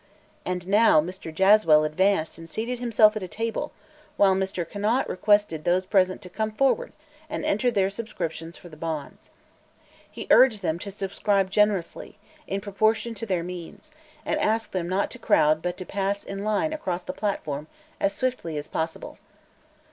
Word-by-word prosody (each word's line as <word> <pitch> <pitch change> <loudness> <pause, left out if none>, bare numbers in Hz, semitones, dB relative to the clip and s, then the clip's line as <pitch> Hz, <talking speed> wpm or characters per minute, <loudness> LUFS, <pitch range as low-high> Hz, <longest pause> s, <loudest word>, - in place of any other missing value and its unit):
And 180 -1 -3
now 205 -4 +5
Mr. 175 +1 -5
Jaswell 190 -3 +5
advanced 165 +1 +1
and 165 0 -11
seated 235 +5 -3
himself 225 -3 +4
at 215 - -3
a 185 - -5
table, 230 - -3 0.5
while 195 -1 +5
Mr. 190 -3 -2
Conant 215 +7 0
requested 205 -5 +2
those 180 +2 +1
present 185 0 +1
to 180 - -9
come 220 -1 -1
forward 275 - +1 0.4
and 310 - -4
enter 215 +5 +2
their 195 -4 +1
subscriptions 170 -6 -5
for - - -13
the 160 - -12
bonds. 155 -2 -6 0.8
He - - -8
urged 225 -6 +6
them 165 -1 -1
to 200 - -6
subscribe 195 0 -1
generously, 210 -4 0 0.3
in 195 +1 -2
proportion 215 +3 0
to 225 +1 -7
their 180 -4 0
means, 180 - -9 0.3
and 305 - 0
asked 225 +1 0
them 175 -2 -2
not 190 +2 0
to 255 - -10
crowd 155 -9 +3
but 180 +1 -3
to 185 - -6
pass 200 +1 -2
in 195 0 -6
line 215 +9 0
across 185 - -3
the 185 - -5
platform 155 -9 -3 0.3
as 200 - +2
swiftly 250 -12 -2
as 145 - -5
possible. 160 0 -4
195 Hz, 170 wpm, -25 LUFS, 175-215 Hz, 0.8 s, urged